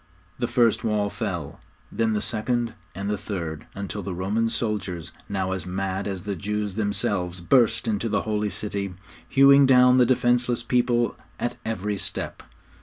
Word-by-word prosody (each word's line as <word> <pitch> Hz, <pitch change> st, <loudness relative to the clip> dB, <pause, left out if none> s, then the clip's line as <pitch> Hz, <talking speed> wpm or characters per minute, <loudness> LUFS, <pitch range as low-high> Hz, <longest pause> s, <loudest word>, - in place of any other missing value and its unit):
The -, -, 0 dB
first 115 Hz, -2 st, +3 dB
wall 105 Hz, -2 st, 0 dB
fell, 95 Hz, -, -4 dB, 0.3 s
then 115 Hz, -1 st, +1 dB
the 105 Hz, -, 0 dB
second 120 Hz, +1 st, -1 dB, 0.2 s
and 100 Hz, +2 st, -4 dB
the 105 Hz, -1 st, -1 dB
third, 85 Hz, -7 st, -5 dB
until 100 Hz, +1 st, -4 dB
the 95 Hz, -2 st, -4 dB
Roman 105 Hz, +5 st, 0 dB
soldiers, 105 Hz, -7 st, -3 dB, 0.2 s
now 95 Hz, -2 st, -1 dB
as 95 Hz, -1 st, -3 dB
mad 95 Hz, +1 st, -2 dB
as 95 Hz, -3 st, -4 dB
the 100 Hz, -1 st, -3 dB
Jews 105 Hz, +2 st, -2 dB
themselves, 95 Hz, -3 st, -1 dB
burst 110 Hz, +7 st, +3 dB
into 110 Hz, +1 st, 0 dB
the 100 Hz, -1 st, 0 dB
Holy 105 Hz, -1 st, -1 dB
City, 100 Hz, -1 st, -3 dB, 0.3 s
hewing 140 Hz, 0 st, +7 dB
down 125 Hz, -1 st, +6 dB
the 125 Hz, -, +6 dB
defenceless 120 Hz, -1 st, +2 dB
people 120 Hz, 0 st, +2 dB, 0.2 s
at 120 Hz, -, -2 dB
every 105 Hz, -2 st, -2 dB
step. -, -, -5 dB
105 Hz, 160 wpm, -25 LUFS, 95-115 Hz, 0.3 s, hewing